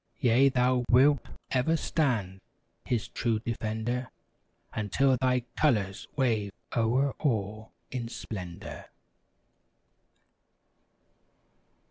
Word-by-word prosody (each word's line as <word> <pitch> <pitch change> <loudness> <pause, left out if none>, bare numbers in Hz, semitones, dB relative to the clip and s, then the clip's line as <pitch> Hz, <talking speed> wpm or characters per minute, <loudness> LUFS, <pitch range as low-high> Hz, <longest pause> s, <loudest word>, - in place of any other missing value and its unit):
Yea! 130 0 +5
thou 125 -1 +2
wilt 135 +4 +5 0.3
ever 135 +6 +2
stand. 110 - 0 0.4
His 120 -4 -1
true 115 -2 0
defender. 115 +2 -3 0.6
Until 130 +6 +2
thy 125 0 +2
colors 105 -10 +1
wave 115 -7 +1 0.2
o'er 125 +5 +2
all 110 -5 -1 0.2
in 125 -3 -3
splendor. 95 -7 -7
120 Hz, 80 wpm, -29 LUFS, 110-130 Hz, 0.6 s, Yea